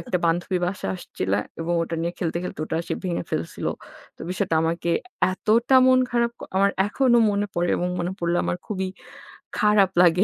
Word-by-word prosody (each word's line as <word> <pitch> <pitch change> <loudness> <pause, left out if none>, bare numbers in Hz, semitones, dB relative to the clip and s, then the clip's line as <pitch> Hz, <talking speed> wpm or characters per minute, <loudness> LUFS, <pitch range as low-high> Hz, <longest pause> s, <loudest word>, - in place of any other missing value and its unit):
একটা 215 -8 -2
বান্ধবী 175 +3 0
বাসায় 190 +2 -3
আসছিলো 100 - -2 0.2
এবং 170 +1 -1
ওটা 165 - -4
নিয়ে 170 +1 -1
খেলতে, 170 -2 -2
খেলতে, 170 - -6
ওটা 160 - -2
সে - - 0
ভেঙে 175 -2 -1
ফেলছিল। 80 - -3 0.5
তো - - -28
বিষয়টা 185 -2 -1
আমাকে 170 +1 -1 0.4
এতটা 230 +7 +3
মন 255 0 +6
খারাপ 235 -1 +1
ক - - -8
আমার 200 +1 +4 0.2
এখনো 240 +3 +3
মনে 205 0 0
পড়ে 175 0 0
এবং 180 - -1
মনে 175 +2 -2
পড়লে 170 0 0
আমার 175 - -1
খুবই 190 -2 -2 0.7
খারাপ 210 -2 +4
লাগে 180 +2 +5
180 Hz, 180 wpm, -24 LUFS, 170-210 Hz, 0.7 s, মন